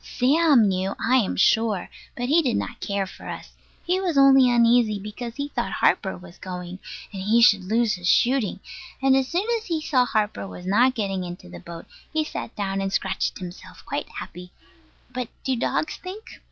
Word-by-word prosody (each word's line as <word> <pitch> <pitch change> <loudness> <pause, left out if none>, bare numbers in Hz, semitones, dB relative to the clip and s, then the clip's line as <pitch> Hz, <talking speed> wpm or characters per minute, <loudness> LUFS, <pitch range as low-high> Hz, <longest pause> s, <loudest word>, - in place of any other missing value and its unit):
Sam 275 -3 +3
knew, 190 0 -1
I 255 +3 +3
am 225 -7 0
sure; 215 -1 +2 0.3
but 245 - -2
he 315 +5 +4
did 255 -7 0
not 245 - -4
care 200 -1 -2
for 190 - -11
us. - - -8 0.3
He 360 +2 +1
was 355 -6 -1
only 270 -2 +7
uneasy 235 -2 +4
because 210 +4 -7
he 285 0 -4
thought - - -3
Harper 190 - +1
was 180 0 -14
going, 180 0 -7 0.3
and 195 - -5
he 215 +5 +3
should 205 -5 +5
lose 225 +2 +1
his 180 -3 -2
shooting; 240 -6 +2 0.4
and 270 0 +4
as 265 -1 +2
soon 350 +8 -1
as 445 - -14
he 330 -3 -1
saw 265 -5 +2
Harper 215 -3 -1
was 180 - -10
not 245 +7 +3
getting 195 -4 -2
into 175 - -8
the 85 0 -9
boat, 165 - -10 0.3
he 315 0 +1
sat 300 - -6
down 195 -2 -2
and 195 0 -2
scratched - - -1
himself, 180 -1 -10
quite - - -4
happy. 180 0 -9 0.6
But 250 -2 -4
do 265 -2 0
dogs 255 +5 -1
think? 395 +5 -10
230 Hz, 195 wpm, -24 LUFS, 195-265 Hz, 0.6 s, only